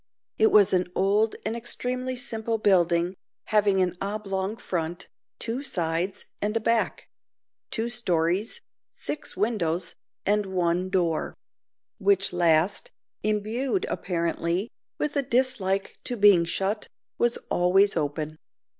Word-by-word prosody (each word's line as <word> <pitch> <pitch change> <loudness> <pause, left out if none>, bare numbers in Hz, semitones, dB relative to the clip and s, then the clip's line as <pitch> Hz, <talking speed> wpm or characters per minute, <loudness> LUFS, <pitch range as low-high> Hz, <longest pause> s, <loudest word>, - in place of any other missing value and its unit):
It 220 - +6
was 205 -3 +6
an 180 -1 +1
old 205 +3 +2
and 220 +2 -1
extremely 250 +2 -2
simple 225 -3 -1
building, 175 -4 +3 0.4
having 205 -3 +3
an 180 -1 -2
oblong 200 0 -2
front, 170 -3 -4 0.3
two 240 +4 -3
sides, 175 - -1 0.2
and 210 +2 0
a - - +1
back; 230 0 0 0.6
two 225 0 -1
stories, 200 - 0 0.3
six 300 - 0
windows, 180 -6 0 0.3
and 205 0 +2
one 180 0 0
door; 175 -4 0 0.6
which 195 -2 +2
last, 175 +2 +2 0.3
imbued, 225 - 0
apparently, 170 +3 -1 0.3
with 300 0 -1
a 280 - +3
dislike 240 -7 0
to 245 - -2
being 200 -5 +6
shut, 195 +5 -1 0.3
was 240 0 +3
always 190 +3 +4
open. 155 0 -2
195 Hz, 120 wpm, -26 LUFS, 175-225 Hz, 0.6 s, It